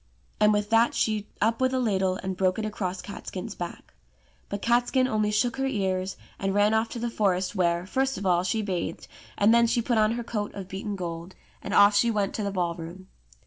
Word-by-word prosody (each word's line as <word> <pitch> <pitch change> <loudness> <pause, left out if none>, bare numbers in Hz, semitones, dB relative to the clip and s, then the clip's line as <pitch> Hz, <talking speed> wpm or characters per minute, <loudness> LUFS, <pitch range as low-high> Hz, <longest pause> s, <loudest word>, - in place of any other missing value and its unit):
And 210 0 +5
with 210 +1 0
that 230 +1 +4
she 215 -2 0
up 225 +3 +1
with 260 0 +2
a - - +1
ladle 190 -6 +1
and 190 -1 -3
broke 185 0 +1
it 220 - -2
across 190 -4 -3
Catskin's 200 +1 -7
back. 175 -2 -8 0.6
But 200 0 -5
Catskin 245 +2 +2
only 215 -3 +1
shook 230 +4 +1
her 270 0 0
ears, 190 -6 -1 0.2
and 195 0 -1
ran 205 +1 +4
off 220 +1 +1
to 240 - -5
the 240 - -1
forest, 190 -4 0
where, 175 -2 +1
first 265 +6 0
of 200 - -5
all, 175 -2 +3
she 215 +4 -1
bathed, 185 -4 -3 0.3
and 205 +3 +5
then 235 0 +5
she 235 - +1
put 235 -1 +1
on 215 +1 +3
her 240 0 -3
coat 210 -3 -4
of 195 -2 -6
beaten 200 +2 -4
gold, 170 -1 -6 0.3
and - - -6
off 205 0 +7
she 235 +3 +4
went 205 -3 0
to 215 - -3
the 200 - -1
ball 180 -3 -1
room. 175 +3 -9
205 Hz, 225 wpm, -26 LUFS, 185-225 Hz, 0.6 s, off